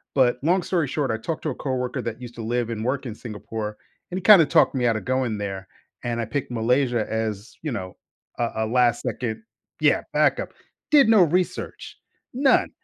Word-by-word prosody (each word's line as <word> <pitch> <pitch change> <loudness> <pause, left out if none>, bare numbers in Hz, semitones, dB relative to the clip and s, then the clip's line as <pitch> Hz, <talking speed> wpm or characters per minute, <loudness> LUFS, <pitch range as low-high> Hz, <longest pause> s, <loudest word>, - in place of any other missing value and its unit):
but, 125 -2 +3
long 180 +3 +2
story 170 -6 0
short, 140 -1 -1
I 110 - -1
talked 155 +8 -4
to 155 - -1
a - - -6
coworker 130 -1 -2
that 115 +1 -5
used 120 -1 -9
to 115 - -6
live 120 +1 -1
and 110 -1 -4
work 135 +2 -1
in 120 - -4
Singapore, 110 -1 -6 0.4
and 180 - -3
he - - -3
kinda 190 -4 +8
talked - - +4
me 125 -2 +1
out 115 - +2
of 110 - -4
going 130 -4 0
there. 95 -2 -5 0.4
And 120 -1 -1
I - - -2
picked 130 +5 -3
Malaysia 120 0 +1
as, 110 -1 -3
you 155 - -3
know, 95 -5 -6 0.4
a 120 -1 0
a - - 0
last 120 +1 +2
2nd 120 - -4 0.4
yeah, - - +3
backup. - - +1 0.4
Did 280 -6 +6
no 215 -5 +7
research. 180 +2 -2 0.3
None! 265 +1 +3
125 Hz, 200 wpm, -24 LUFS, 110-145 Hz, 0.4 s, kinda